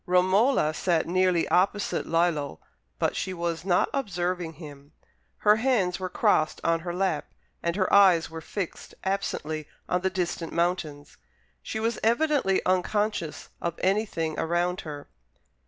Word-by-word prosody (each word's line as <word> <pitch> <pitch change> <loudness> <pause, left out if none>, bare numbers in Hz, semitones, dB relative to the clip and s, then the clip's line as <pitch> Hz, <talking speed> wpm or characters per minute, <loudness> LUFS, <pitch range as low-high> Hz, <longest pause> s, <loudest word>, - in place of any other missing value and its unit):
Romola 185 - +3
sat 165 0 +1
nearly 180 -1 +2
opposite 200 +3 +1
Lillo, 165 - 0 0.4
but - - 0
she 185 - -3
was 170 -1 -2
not 180 -2 +3
observing 180 -8 -2
him. 145 -2 -12 0.4
Her 210 0 +4
hands 220 -8 +1
were 185 -1 -3
crossed 155 -3 +2
on 165 0 +2
her 175 +1 -5
lap, 185 +2 -1 0.3
and 170 0 -1
her 190 -1 +1
eyes 185 -5 +6
were 165 0 -8
fixed 185 +2 -6
absently 160 -6 -2 0.2
on 180 - 0
the 190 - +1
distant 175 -3 -3
mountains: 165 -4 -2 0.4
she 220 - -4
was 225 +1 -1
evidently 240 -3 +2
unconscious 185 -2 -1
of 170 -1 -3
anything 190 -5 0
around 175 +2 0
her. 145 -2 -8
180 Hz, 140 wpm, -27 LUFS, 165-195 Hz, 0.4 s, eyes